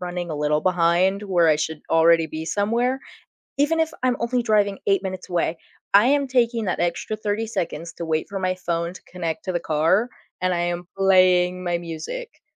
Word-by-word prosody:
running 175 -1 -4
a 155 - -3
little 150 +1 +1
behind 180 +3 +2
where 180 -5 +2
I 155 - +4
should 155 0 -3
already 165 0 +5
be 160 0 -6
somewhere, 235 +8 0 0.6
even 295 +3 +2
if 320 0 +1
I'm 250 -1 +2
only 240 +1 0
driving 205 -3 +2
8 195 -2 +3
minutes 185 -1 -6
away, 170 -2 0 0.4
I 205 +3 +7
am 280 0 +2
taking 235 -3 +1
that 185 - -1
extra 175 +5 -1
30 215 +1 -2
seconds 170 -5 -4
to 170 - -6
wait 160 -1 -1
for 200 -1 -4
my 185 -1 0
phone 170 -1 -3
to - - -12
connect 165 -3 -5
to 185 - -1
the 175 - 0
car, 165 +10 +2 0.3
and 185 0 +1
I 175 - -1
am 175 0 -3
playing 185 -1 +4
my 175 -1 0
music. 170 - -7
180 Hz, 195 wpm, -23 LUFS, 170-210 Hz, 0.6 s, I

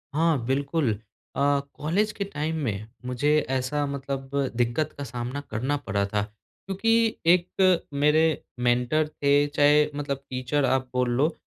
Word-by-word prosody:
हाँ, 165 -1 +3
बिल्कुल। 140 0 0 0.4
अ, 140 0 +3
कॉलेज 200 +8 0
के 205 - -3
टाइम 160 -4 -3
में 105 -2 -3 0.2
मुझे 125 +4 0 0.2
ऐसा 135 +3 0
मतलब 135 -1 -4 0.3
दिक्कत 120 +6 0
का 140 - -4
सामना 125 +3 -5
करना 130 +7 -1
पड़ा 100 0 +1
था। 105 +1 -1
क्योंकि 205 - -1 0.2
एक 180 0 +2
मेरे 150 +3 +3 0.4
मेंटर 125 +5 +2
थे 140 -2 -1 0.2
चाहे 150 +1 +5
मतलब 140 -2 -2
टीचर 130 +2 0
आप 130 -1 0
बोल 125 -1 +1
लो, 140 +7 +1
140 Hz, 140 wpm, -26 LUFS, 125-155 Hz, 0.4 s, चाहे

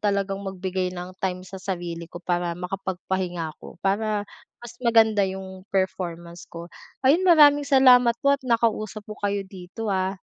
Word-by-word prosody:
talagang 200 -1 -1
magbigay 190 -1 -3
ng 180 0 -7
time 185 -1 -2
sa 190 0 -9
sarili 175 -3 -5
ko - - -11
para 175 -1 -2
makapagpahinga 180 -2 -3
ako, - - -12
para 205 +1 0 0.3
mas 240 0 -11
maganda 225 -3 +4
yung 190 0 -8
performance 175 -3 -3
ko. 170 0 -8 0.4
Ayun, 335 +8 +4
maraming 290 -3 +6
salamat 250 -3 +6
po 280 - +5
at 280 - 0
nakausap 225 -4 0
ko 210 0 -10
kayo 200 -1 -1
dito, 190 +3 -6
ha. 190 0 -1
195 Hz, 150 wpm, -24 LUFS, 180-220 Hz, 0.4 s, maraming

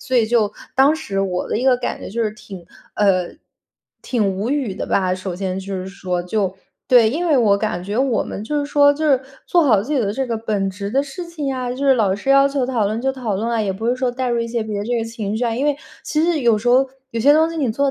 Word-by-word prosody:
所 260 - -1
以 235 - +4
就 220 -2 +2 0.2
当 275 +4 +5
时 195 -10 -3
我 185 -2 -2
的 - - -1
一 250 - -2
个 260 -2 +5
感 245 - -3
觉 - - -7
就 230 +3 -1
是 215 - 0
挺 195 -4 -11 0.3
呃， 185 -4 +2 0.7
挺 205 -6 0
无 215 +5 -2
语 275 -8 -1
的 - - -4
吧， 185 -2 +1
首 185 -1 -5
先 190 0 -3
就 195 +1 -6
是 185 0 -4
说， 185 -2 -3
就 190 +1 -1 0.3
对， 235 -3 +6
因 335 +7 -2
为 310 -4 +3
我 210 -5 +4
感 200 -4 -2
觉 205 +5 -3
我 260 -3 +2
们 205 - -6
就 295 +6 -1
是 285 - -3
说 285 0 +5
就 310 +2 -3
是 270 -3 +4 0.3
做 345 -2 +3
好 215 -8 +4
自 265 +8 -5
己 290 - +2
的 205 -3 0
这 265 +4 -1
个 230 -2 -2
本 210 -3 -1
职 200 +1 -5
的 270 +3 +2
事 285 +5 -7
情 330 -4 -5
呀， 255 -2 -2
就 250 - -5
是 270 - +5
老 205 -6 +2
师 210 +7 -2
要 275 0 +6
求 275 -2 -1
讨 240 -5 0
论 215 +3 -2
就 265 +2 +1
讨 240 -6 -3
论 225 +4 -2
啊， 230 -1 0
也 200 -3 0
不 220 +5 -3
是 245 - +1
说 255 0 0
带 255 +1 -2
入 240 -1 0
一 230 - -2
些 230 -1 -2
别 215 -2 -4
的 205 - -3
这 245 0 0
个 230 - 0
情 220 -2 -4
绪 245 - -1
啊。 235 - 0
因 260 +5 -1
为 295 -1 +1 0.3
其 305 - 0
实 335 -1 +2
有 235 -3 +4
时 235 +4 -2
候， 260 +2 +5 0.2
有 230 - -3
些 280 +5 +6
东 320 +2 +3
西 330 - -6
你 265 -7 0
做 280 +4 +1
230 Hz, 310 characters per minute, -20 LUFS, 200-270 Hz, 0.7 s, 对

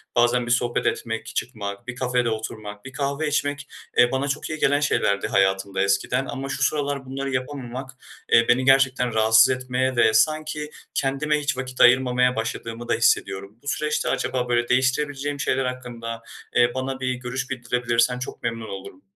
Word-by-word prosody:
bazen 120 +1 +3
bir 120 - -3
sohbet 120 0 +1
etmek, 115 -1 -2
çıkmak, 105 -2 -4
bir 125 - -5
kafede 125 -1 0
oturmak, 110 -1 -6
bir 130 - -9
kahve 140 +3 -1
içmek, 145 -1 -1 0.3
eee, 120 0 +6
bana 135 +1 -1
çok 140 +2 -3
iyi 155 -1 -4
gelen 145 0 +3
şeylerdi 100 -8 +1
hayatımda 95 0 +1
eskiden 100 +7 +1
ama 135 0 -5
şu 135 0 -2
sıralar 140 -1 0
bunları 135 +1 -4
yapamamak, 130 0 -4 0.4
eee, 115 0 +6
beni 125 +2 +3
gerçekten 130 -3 +3
rahatsız 110 0 +6
etmeye 130 0 -1
ve 110 -2 +4
sanki 155 0 +1 0.2
kendime 150 +3 0
hiç 140 -3 -2
vakit 130 -1 -3
ayırmamaya 125 0 +5
başladığımı 115 +1 -4
da - - +1
hissediyorum. 100 +3 0
Bu - - -13
süreçte 150 +1 -1
acaba, 125 -1 -1
böyle, 120 0 +1
değiştirebileceğim 140 +2 0
şeyler 135 -1 0
hakkında, 120 -2 -5 0.3
eee, 120 0 +4
bana 130 0 -3
bir 130 -1 -1
görüş 125 +1 -4
bildirebilirsen 125 -1 0
çok 130 - -7
memnun 115 -1 -3
olurum. 95 -1 -9
125 Hz, 165 wpm, -24 LUFS, 115-135 Hz, 0.4 s, eee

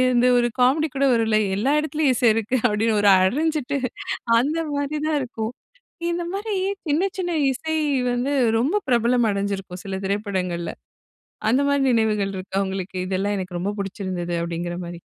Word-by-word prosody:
இந்த 240 +1 +4
ஒரு 240 0 +3
காமெடி 280 +6 +4
கூட 275 +1 +2
வருல்ல 225 -2 +2 0.2
எல்லா 250 +8 +1
இடத்துலயும் 300 -3 +1
இசை 240 - +3
இருக்கு. 225 +3 -1
அப்படின்னு 215 +1 +1
ஒரு 205 - +5
அடைஞ்சிட்டு 285 +7 +1 0.6
அந்த 300 +6 0
மாதிரி 285 +1 -2
தான் 310 -2 +1
இருக்கும். 230 -2 -4 0.6
இந்த 345 0 -2
மாரி 415 +2 -3 0.4
சின்ன 310 +6 +2
சின்ன 355 -2 -2 0.2
இசை 315 +4 -3 0.4
வந்து 250 +4 0 0.3
ரொம்ப 290 - +1
பிரபலம் 240 0 +3
அடைஞ்சிருக்கும் 195 -2 -3
சில 190 -1 -3
திரைப்படங்கள்ல. 190 -4 -2 0.8
அந்த 260 +4 +3
மாரி 280 -1 +2
நினைவுகள் 210 -4 +1
இருக்கா 190 +1 -5
உங்களுக்கு, 190 0 -5
இதெல்லாம் 195 +2 -1
எனக்கு 180 -2 -4
ரொம்ப 200 +3 -2
பிடிச்சிருந்தது. 185 -3 -3
அப்படிங்கிற 175 +1 -4
மாரி? 170 0 -8
225 Hz, 150 wpm, -23 LUFS, 190-280 Hz, 0.8 s, ஒரு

